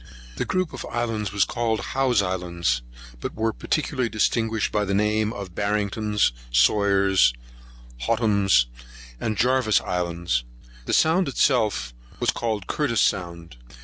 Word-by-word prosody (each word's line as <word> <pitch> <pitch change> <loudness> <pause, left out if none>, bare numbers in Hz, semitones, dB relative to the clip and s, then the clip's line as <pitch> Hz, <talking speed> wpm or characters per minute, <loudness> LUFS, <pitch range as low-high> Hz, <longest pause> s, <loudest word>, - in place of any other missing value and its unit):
The - - -1
group 185 -3 -1
of - - -6
islands 115 -4 -2
was 100 -1 +2
called 115 -3 -1
Howe's 130 -6 +2
Islands, 85 -8 -1 0.4
but - - -5
were 110 0 0
particularly 130 -6 -1
distinguished 110 0 0
by 105 - +1
the 100 -1 -1
names 105 +1 +1
of 95 -3 -7
Barrington's, 105 +1 0 0.2
Sawyer's, 95 - +4 0.6
Hotham's, 100 - +3 0.5
and 110 -1 -2
Jarvis's 125 -2 +3
Islands. 85 -7 -1 0.4
The - - -1
sound 165 +3 +3
itself 110 - +1 0.3
was - - +2
called 110 -5 -3
Curtis's 135 -7 +1
Sound. 85 -6 -3
105 Hz, 125 wpm, -24 LUFS, 90-115 Hz, 0.6 s, Sawyer's